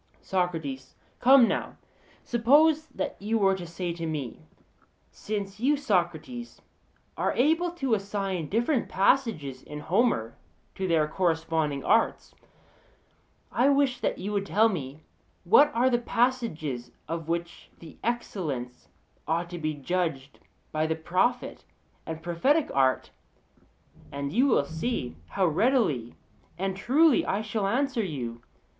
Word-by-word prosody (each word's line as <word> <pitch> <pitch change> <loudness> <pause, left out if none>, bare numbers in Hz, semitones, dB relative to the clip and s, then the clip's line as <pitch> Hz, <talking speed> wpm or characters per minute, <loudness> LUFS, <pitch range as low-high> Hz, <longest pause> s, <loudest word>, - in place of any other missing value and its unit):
SOCRATES: 160 -8 -2 0.2
Come 260 -1 +7
now, - - -3 0.5
suppose 295 +7 +4
that - - -5
you 220 +3 0
were 195 -2 +3
to 180 -2 -5
say 170 +1 -4
to 165 -1 -5
me: 145 - -4 0.7
'Since 205 -1 -5
you, 285 +5 +2
Socrates, 215 - -2 0.6
are - - 0
able 325 +7 +2
to 270 -8 -1
assign 195 -5 -2
different 235 +5 0
passages 190 - +1
in 150 0 -8
Homer 170 - +1 0.4
to 190 - -3
their 160 -3 +2
corresponding 160 -4 0
arts, 225 - +1 1.2
I 255 +3 +3
wish 275 -3 +2
that - - -1
you 205 +3 -4
would 200 -1 -1
tell 220 +2 +4
me 150 -5 -5 0.4
what 300 -10 +6
are 245 +2 +3
the 240 -2 +2
passages 230 - -1 0.2
of 165 -1 -4
which 170 +1 -4
the 165 -2 -13
excellence 160 - -3 0.4
ought 170 +2 -1
to 175 - -5
be 155 -1 -2
judged 145 -2 -3 0.3
by 155 0 0
the 160 - 0
prophet 185 +10 -1 0.4
and 160 0 -6
prophetic 265 - +1
art'; 130 -1 +2 1.0
and 140 0 -4
you 255 +6 +4
will 220 - +3
see 160 - -3
how 195 - 0
readily 165 - +1 0.4
and 190 +1 -2
truly 280 +8 +4
I 200 +3 -1
shall 215 -2 -1
answer 255 +1 0
you. 120 - -5
190 Hz, 130 wpm, -27 LUFS, 155-240 Hz, 1.2 s, Come